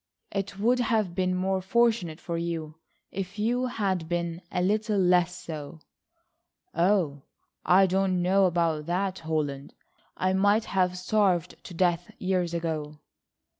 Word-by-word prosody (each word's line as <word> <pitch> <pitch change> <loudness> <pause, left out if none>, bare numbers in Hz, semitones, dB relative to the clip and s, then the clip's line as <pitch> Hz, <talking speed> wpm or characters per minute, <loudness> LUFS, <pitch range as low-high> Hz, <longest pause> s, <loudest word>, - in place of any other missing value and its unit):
"It 195 0 -3
would 240 +5 +2
have 220 -6 +1
been 185 0 0
more 190 +1 0
fortunate 195 -5 +1
for 170 - -4
you 165 -2 -3 0.4
if 195 +1 -5
you 245 +4 0
had 190 -8 -2
been 170 0 -2
a - - -1
little 210 +2 +1
less 180 -1 +3
so." 155 -1 -7 0.9
"Oh, 170 -5 +1 0.4
I 190 +2 +5
don't 185 -1 +1
know 190 +2 +4
about 165 -3 0
that, 190 +2 -1
Holland. 150 -4 -3 0.4
I 185 0 +1
might 205 +3 +3
have 180 -1 0
starved 185 -2 0
to 175 - -9
death 175 0 +1
years 180 -2 -1
ago." 155 -3 -3
180 Hz, 135 wpm, -27 LUFS, 170-195 Hz, 0.9 s, I